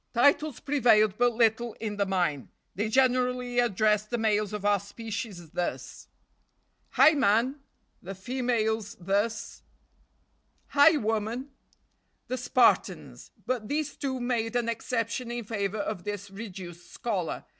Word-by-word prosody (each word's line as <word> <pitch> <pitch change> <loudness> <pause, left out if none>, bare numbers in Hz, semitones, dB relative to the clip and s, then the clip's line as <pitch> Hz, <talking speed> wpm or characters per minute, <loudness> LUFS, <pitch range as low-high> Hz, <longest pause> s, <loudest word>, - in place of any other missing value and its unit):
Titles 285 +2 +3
prevailed 230 -8 +3
but 245 0 +3
little 230 0 +2
in 210 -2 -5
the 200 -1 0
mine. 175 -8 -1 0.2
They 210 +3 -2
generally 250 0 +2
addressed 215 -2 +2
the 240 - -1
males 215 -2 +1
of 210 -1 -5
our 205 -1 +3
species 200 -4 -7
thus: 175 - -4 0.9
"Hi! - - +7
man!" 255 0 +2 0.4
The 195 +2 -7
females 220 -1 -1
thus: 200 +5 -2 1.1
"Hi! 295 +2 +6
woman!" 225 +3 -2 0.8
The 255 - -1
Spartans! 250 +1 +1 0.2
but 245 -4 -2
these 300 +2 -2
two 265 -2 -3
made 240 -2 -1
an 240 -1 +1
exception 230 +1 -2
in 240 0 -4
favor 205 -1 -3
of 205 -3 -3
this 205 -1 -5
reduced 185 -4 -9
scholar. 200 -9 -3
225 Hz, 125 wpm, -28 LUFS, 205-245 Hz, 1.1 s, Hi